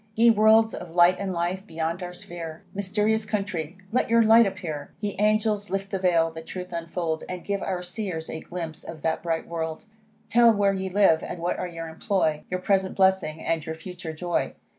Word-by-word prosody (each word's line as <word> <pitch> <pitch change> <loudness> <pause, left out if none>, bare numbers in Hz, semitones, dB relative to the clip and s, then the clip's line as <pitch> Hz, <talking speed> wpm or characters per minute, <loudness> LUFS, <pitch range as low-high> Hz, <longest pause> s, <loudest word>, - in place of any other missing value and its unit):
Ye 230 +1 +6
worlds 220 +1 +5
of 175 - -7
light 175 +2 +5
and 195 -1 -2
life, 180 +2 -2
beyond 165 +2 -3
our 180 0 -6
sphere; 165 -2 -8
Mysterious 210 +3 +1
country! 195 -6 -3
let 250 - +1
your 230 0 +5
light 225 0 +7
appear. 170 -7 -5
Ye 205 -1 -3
angels, 210 -1 +2
lift 195 0 -3
the 195 - -1
vail, 170 -3 +3
the 160 0 -8
truth 180 +2 -7
unfold, 165 -1 -3
And 180 -1 -6
give 200 -1 -1
our 180 -1 -2
Seers 180 -3 -4
a 160 - -5
glimpse 165 -2 -6
of 160 -3 -9
that 160 0 0
bright 165 -1 -2
world; 160 0 -4 0.4
Tell 235 0 +6
where 200 -2 +2
ye 190 0 -3
live, 185 -4 +4
and - - -5
what 175 +1 -1
are 180 - -2
your 165 -1 -6
employ, 160 -2 0
Your 185 0 -2
present 190 -1 +1
blessing, 190 -5 +2
and 165 -2 0
your 160 +1 -5
future 175 0 -7
joy. 175 +2 -2
180 Hz, 200 wpm, -26 LUFS, 165-200 Hz, 0.4 s, light